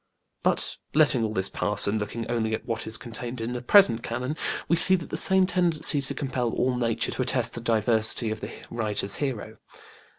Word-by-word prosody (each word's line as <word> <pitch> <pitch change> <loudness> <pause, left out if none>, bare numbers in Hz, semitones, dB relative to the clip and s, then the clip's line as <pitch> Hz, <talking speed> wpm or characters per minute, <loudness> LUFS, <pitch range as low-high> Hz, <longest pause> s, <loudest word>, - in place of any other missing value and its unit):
But - - +1 0.2
letting 145 -6 +3
all 110 - -1
this 95 - -1
pass - - -1
and 105 +2 0
looking 110 +3 -5
only 115 -2 -1
to 110 - -1
what 115 -2 -4
is 110 0 -2
contained 120 +1 -7
in 115 +2 -4
the 125 - -5
present 125 - +5
Canon, 125 +5 -4 0.3
we 170 - +3
see 185 +2 +5
the 175 - -5
same 190 -1 +4
tendency 170 -5 +1
to 135 - 0
compel 130 -3 -2
all 125 0 0
nature 115 -2 -1
to - - -3
attest 125 -2 0
the 120 - -7
divinity 110 0 +3
of 110 - -5
the - - -6 0.2
writer's 105 -3 -2
hero. 115 -6 -4
120 Hz, 195 wpm, -25 LUFS, 110-140 Hz, 0.3 s, present